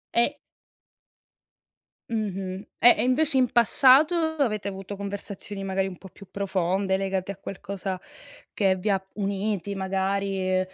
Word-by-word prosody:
E 260 +5 +3 1.7
Mh-mh. 195 -3 -3
Eh, 240 - +9
e - - +1
invece 270 +3 +2
in 255 -2 +3
passato 265 - +5 0.2
avete 215 -8 0
avuto 195 0 -6
conversazioni 200 0 -5
magari 195 0 -1
un 185 -2 -8
po' 190 - -12
più 200 +2 -15
profonde, 190 0 0
legate 195 0 -2
a 200 - -9
qualcosa 195 -1 -5 0.5
che 195 -2 +2
vi 185 +3 -3
ha 195 -2 +2
uniti 200 -1 -2
magari, 190 0 -1
195 Hz, 130 wpm, -26 LUFS, 190-215 Hz, 1.7 s, Eh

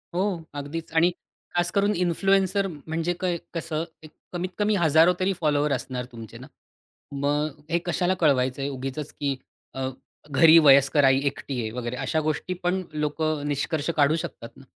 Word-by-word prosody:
हो. 185 -3 -1
अगदीच 145 +3 -5
आणि 170 +2 +5 0.4
खास 175 0 +1
करून 200 +1 +2
इन्फ्लुएन्सर 195 +2 +2
म्हणजे 160 +1 -3
कय 180 -2 0 0.2
कसं 165 -2 -3 0.2
एक 155 - -12 0.2
कमीत 180 +1 -2
कमी 210 0 +2
हजारो 165 0 +5
तरी 190 +1 +1
फॉलोवर 150 -1 +2
असणार 125 -1 -4
तुमचे 115 -3 -10
ना. - - -11 0.6
मगं 145 +1 -1
हे 170 +1 +1
कशाला 180 +1 +1
कळवायचंय 135 -2 +1
उगीचच, 135 +2 -5
की 140 -2 -2 0.4
अ 130 0 -3 0.4
घरी 160 +3 +7
वयस्कर 140 -1 +6
आई 135 0 +5
एकटी 135 -1 -3
आहे, 110 - -3
वगैरे 120 +1 -4
अशा 160 - -1
गोष्टी 155 +4 -2
पण 180 +2 +1
लोकं 150 0 -1
निष्कर्ष 145 +2 -1
काढू 145 +1 +4
शकतात 115 - -8
ना. - - -14
155 Hz, 160 wpm, -25 LUFS, 140-175 Hz, 0.6 s, घरी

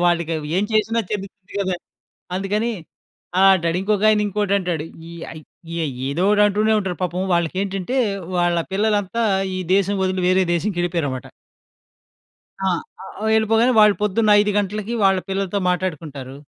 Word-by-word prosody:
వాళ్ళకి 170 -1 +1 0.2
ఏం 200 - +2
చేసినా 220 +2 +2
చెందుతుంది 200 -1 -6
కదా! 185 -2 -1 0.6
అందుకని 210 +5 -1 0.7
ఆహ్, 195 0 +7
అంటాడు. 170 -1 -1
ఇంకొకాయన 210 +1 +3
ఇంకోటి 205 0 -1
అంటాడు. 170 -4 -2 0.2
ఇ 170 0 -9 0.3
ఏదో 170 +6 -1
ఒకటి 210 0 +4
అంటూనే 215 +2 +2
ఉంటారు. 185 -3 -4
పాపం 180 +1 -2
వాళ్ళకి 170 0 0
ఏంటంటే 195 +6 -3 0.4
వాళ్ళ 175 -1 +2 0.2
పిల్లలంతా 210 +2 0 0.3
ఈ - - -3 0.2
దేశం 200 +1 +1
వదిలి 185 0 0
వేరే 185 +1 +4
దేశంకెళ్ళిపోయారు 175 -4 -1
అన్నమాట. 130 -1 -6 1.4
ఆ! - - +2 0.7
వెళ్ళిపోగానే 225 +3 +3
వాళ్ళు 210 -1 +6
పొద్దున్న 210 +1 +2
5 210 - +1
గంటలకి 210 +3 -2
వాళ్ళ 190 -1 +4
పిల్లలతో 195 0 -1
మాట్లాడుకుంటారు. 150 -7 -3
190 Hz, 130 wpm, -21 LUFS, 175-210 Hz, 1.4 s, ఆహ్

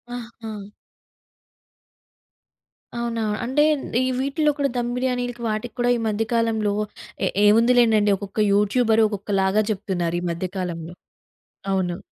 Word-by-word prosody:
ఆహా! 230 -3 -8 2.4
అవునా! 235 -1 -2 0.2
అంటే 265 +5 +2 0.4
ఈ - - +1
వీటిల్లో 280 +3 +1
కూడా, 280 -1 +1
దమ్ 240 0 -1
బిర్యానీలకి 245 -1 -2
వాటికి 215 +2 -3
కూడా 245 0 +2
ఈ - - -4
మధ్యకాలంలో 220 -1 0 0.5
ఏ - - +2 0.2
ఏముందిలేండండి, 225 -1 +5
ఒక్కొక్క 200 +1 -6
యూట్యూబర్ 220 +2 +3
ఒక్కొక్కలాగా 200 0 0
చెప్తున్నారు. 185 -4 -2
ఈ - - -6
మధ్యకాలంలో. 175 -1 -4 0.8
అవును. 180 -2 0
220 Hz, 105 wpm, -23 LUFS, 200-240 Hz, 2.4 s, ఏముందిలేండండి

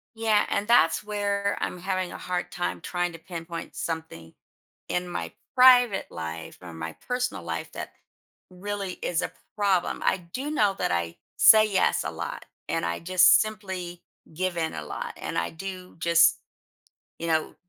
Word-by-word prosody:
Yeah, 220 -2 +3
and 200 +1 -1
that's 165 -9 +4
where 200 -1 -1
I'm 180 - -3
having 185 0 -2
a - - -7
hard 180 -1 -3
time 90 0 -3
trying 175 -1 -2
to 165 - -9
pinpoint 165 -1 -7
something. 160 - -5 0.6
In 180 0 -1
my 175 - -4 0.2
private 245 -5 +6
life 80 0 -6
or 90 -2 -9
my 80 0 -6
personal 250 0 -2
life, - - -4
that - - -6 0.6
really 195 0 -4
is 170 - 0
a - - -3 0.3
problem. 195 -4 +1
I 190 - +3
do 270 +7 -3
know 210 -10 +2
that - - 0
I 85 -1 -1 0.2
say 215 -1 +7
yes 190 - +2
a - - -2
lot, - - -6 0.2
and - - 0
I 85 0 -2
just 185 +1 +6
simply 190 -5 -5 0.3
give 180 +2 -2
in 160 -1 -1
a 75 - -5
lot, - - -5
and - - -4
I 85 - 0
do 185 +1 -8
just, 170 0 +5 0.8
you 170 - -3
know, 160 -1 0
180 Hz, 165 wpm, -26 LUFS, 165-205 Hz, 0.8 s, say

